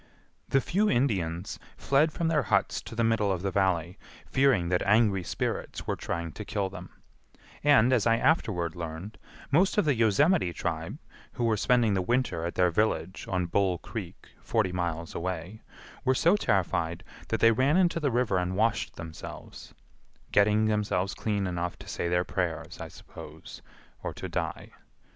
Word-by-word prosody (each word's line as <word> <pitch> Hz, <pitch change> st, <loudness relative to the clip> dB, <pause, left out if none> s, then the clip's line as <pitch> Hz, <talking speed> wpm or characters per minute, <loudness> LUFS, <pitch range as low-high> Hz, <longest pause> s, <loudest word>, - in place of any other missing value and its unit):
The 135 Hz, -, +3 dB
few 205 Hz, +8 st, +1 dB
Indians 95 Hz, -9 st, 0 dB, 0.2 s
fled 145 Hz, +3 st, +2 dB
from 165 Hz, +2 st, -1 dB
their 160 Hz, -2 st, +2 dB
huts 100 Hz, -6 st, +1 dB
to -, -, -10 dB
the 115 Hz, -, +1 dB
middle 115 Hz, -3 st, +2 dB
of 90 Hz, -1 st, -2 dB
the 100 Hz, -, -1 dB
Valley, 90 Hz, -2 st, 0 dB, 0.3 s
fearing 130 Hz, -11 st, +2 dB
that 90 Hz, 0 st, +1 dB
angry 105 Hz, -2 st, +3 dB
spirits -, -, -3 dB
were -, -, -1 dB
trying 85 Hz, -1 st, -4 dB
to 105 Hz, -, -7 dB
kill 100 Hz, -2 st, -2 dB
them; 90 Hz, -1 st, -9 dB, 0.7 s
and, 130 Hz, -4 st, +5 dB
as 120 Hz, -3 st, +3 dB
I 115 Hz, 0 st, +4 dB
afterward 100 Hz, -, +1 dB
learned, 85 Hz, +5 st, -7 dB, 0.3 s
most 185 Hz, +9 st, +3 dB
of 210 Hz, -, +3 dB
the 145 Hz, -, +3 dB
Yosemite 115 Hz, -, +3 dB
tribe, 80 Hz, -2 st, -3 dB, 0.4 s
who 120 Hz, -, -3 dB
were 115 Hz, -2 st, +3 dB
spending 115 Hz, 0 st, +3 dB
the 95 Hz, -, +1 dB
winter 120 Hz, -5 st, 0 dB
at 85 Hz, -, -6 dB
their 90 Hz, -1 st, +3 dB
village 95 Hz, -2 st, -1 dB
on 90 Hz, -2 st, 0 dB
Bull 95 Hz, 0 st, +1 dB
Creek -, -, -8 dB
forty 110 Hz, -5 st, 0 dB
miles 85 Hz, -2 st, -3 dB
away, 90 Hz, +4 st, -4 dB, 0.4 s
were 130 Hz, 0 st, +2 dB
so 170 Hz, +8 st, +4 dB
terrified 85 Hz, -, 0 dB, 0.2 s
that 115 Hz, -, -1 dB
they 115 Hz, -, +6 dB
ran 130 Hz, +8 st, +3 dB
into 175 Hz, -3 st, +3 dB
the 145 Hz, -3 st, +1 dB
river 120 Hz, -6 st, +1 dB
and 90 Hz, +1 st, -2 dB
washed 115 Hz, +2 st, 0 dB
themselves,—getting 100 Hz, +5 st, -3 dB
themselves 105 Hz, -3 st, 0 dB
clean 100 Hz, -3 st, -1 dB
enough 90 Hz, -1 st, -3 dB
to -, -, -13 dB
say -, -, -3 dB
their 90 Hz, +1 st, +2 dB
prayers, 90 Hz, -4 st, -3 dB
I -, -, -5 dB
suppose, -, -, -11 dB, 0.4 s
or -, -, -5 dB
to -, -, -5 dB
die. -, -, -4 dB
100 Hz, 165 wpm, -28 LUFS, 90-120 Hz, 0.7 s, they